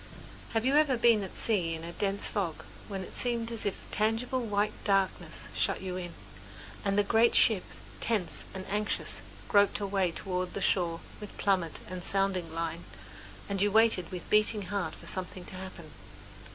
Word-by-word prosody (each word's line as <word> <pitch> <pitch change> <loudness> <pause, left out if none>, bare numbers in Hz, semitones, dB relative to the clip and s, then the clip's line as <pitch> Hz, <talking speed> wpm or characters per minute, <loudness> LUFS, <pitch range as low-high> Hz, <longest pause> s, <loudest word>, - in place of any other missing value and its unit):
Have 225 +1 +1
you 270 +2 +3
ever 295 -5 +4
been 230 -2 +5
at 190 - -6
sea 180 -7 +1
in 160 - -7
a 170 - -5
dense 195 +2 0
fog, 180 -6 -2 0.2
when 195 -2 -4
it - - -10
seemed 235 -2 0
as 225 -2 -1
if 200 - 0
a - - -15
tangible 225 +4 +1
white 210 -2 0
darkness 195 -2 0
shut - - +1
you 185 -1 -3
in, 175 -2 -5 0.7
and 200 0 +1
the 205 - +5
great 225 +3 +4
ship, 210 -5 +5 0.4
tense 205 -7 0
and 190 0 -5
anxious, 210 +2 -1 0.3
groped 205 -1 +4
her 205 - -2
way 195 -2 +1
toward 180 +1 -3
the - - -1
shore 175 -3 +1 0.2
with 210 - -8
plummet 185 -5 +1
and 185 -1 -6
sounding 195 -4 0
line, 165 +1 -3 0.6
and 195 -1 -1
you 205 0 +3
waited 220 -5 +4
with 180 -1 -6
beating 210 0 +4
heart 200 -2 -1
for - - -13
something 185 0 -2
to - - -8
happen? 185 -4 -8
195 Hz, 180 wpm, -30 LUFS, 180-215 Hz, 0.7 s, been